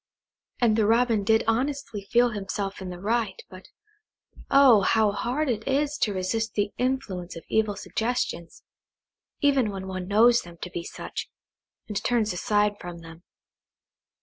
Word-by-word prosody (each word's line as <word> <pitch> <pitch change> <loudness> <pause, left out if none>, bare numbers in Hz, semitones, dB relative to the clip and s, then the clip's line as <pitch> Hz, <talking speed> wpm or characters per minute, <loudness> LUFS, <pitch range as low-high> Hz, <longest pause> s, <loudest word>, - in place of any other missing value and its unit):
And 230 -3 +3
the 215 -2 +2
Robin 230 -2 +3
did 220 +2 +3
honestly 245 -1 -1
feel 240 +2 +4
himself 200 -1 -4
in 185 - -5
the 180 -1 -7
right 215 0 -1
but, 185 0 -12 0.8
oh! 270 -6 +7
how 215 +2 +3
hard 245 +9 -1
it 225 -4 -2
is 285 +2 +1
to 210 - +1
resist 220 +5 -2
the 205 0 0
influence 220 -9 -2
of 165 - -9
evil 215 -2 +1
suggestions, 205 -5 -3 0.8
even 275 -6 +3
when 195 -1 -6
one 185 -1 -5
knows 230 +4 +5
them 175 -1 -13
to 180 - -6
be 170 - -4
such, - - -6 0.6
and 210 -2 -3
turns 225 -4 +1
aside 205 +3 +1
from 175 -1 -8
them. 165 0 -12
215 Hz, 150 wpm, -26 LUFS, 190-240 Hz, 0.8 s, oh